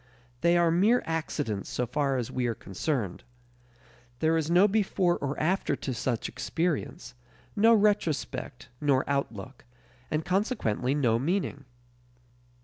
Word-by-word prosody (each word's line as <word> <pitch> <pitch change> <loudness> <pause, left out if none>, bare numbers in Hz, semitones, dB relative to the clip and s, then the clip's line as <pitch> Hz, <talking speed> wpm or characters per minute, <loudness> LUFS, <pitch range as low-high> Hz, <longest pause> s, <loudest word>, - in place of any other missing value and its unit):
They 170 +4 +3
are 170 -1 +3
mere 210 +9 +3
accidents 145 -10 -3
so 125 - -1
far 135 +2 0
as 120 -3 -3
we 125 -1 -1
are 115 - -1
concerned. 100 - -3 0.9
There 160 +5 +2
is 160 -1 0
no 180 +4 +6
before 195 -4 +1
or 140 0 -3
after 180 +5 +1
to 130 - -4
such 120 -1 -2
experience; 150 -1 -3 0.4
no 225 +2 +6
retrospect 205 -7 0
nor 140 -3 +2
outlook, 130 -4 -3 0.5
and 155 +1 -1
consequently 180 - 0
no 120 -6 +2
meaning. 150 -1 -2
150 Hz, 130 wpm, -28 LUFS, 125-180 Hz, 0.9 s, no